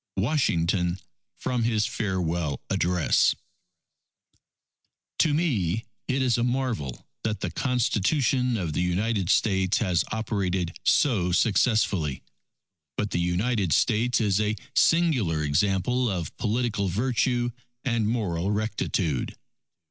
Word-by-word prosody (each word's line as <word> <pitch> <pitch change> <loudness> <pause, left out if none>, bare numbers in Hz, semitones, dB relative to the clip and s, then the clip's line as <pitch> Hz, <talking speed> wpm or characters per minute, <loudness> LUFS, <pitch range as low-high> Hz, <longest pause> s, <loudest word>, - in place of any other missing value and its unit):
_ - - +1
WASHINGTON, 90 - +1 0.4
from 125 -1 -2
his 110 -2 +1
Farewell 85 -7 -2
Address 90 -2 +2 1.8
To 155 - +4
me 115 - 0 0.2
it 130 0 0
is 120 -2 +2
a - - +1
marvel 120 - -2 0.2
that 110 -1 -2
the - - -2
Constitution 125 +1 +1
of 85 -6 -3
the - - 0
United 95 +2 0
States 95 0 +2
has 90 -6 +1
operated 95 -6 -2
so 100 -11 +2
successfully.... 100 - +1 0.7
But 105 -1 -1
the - - 0
United 90 - 0
States 120 - +2
is 105 -2 +2
a 105 0 0 0.2
singular 125 - +3
example 95 - +1
of 90 -5 -4
political 110 -3 -1
virtue 120 +4 0 0.3
and 115 -4 +1
moral 95 -6 -1
rectitude. 105 - -1
105 Hz, 110 wpm, -26 LUFS, 90-120 Hz, 1.8 s, To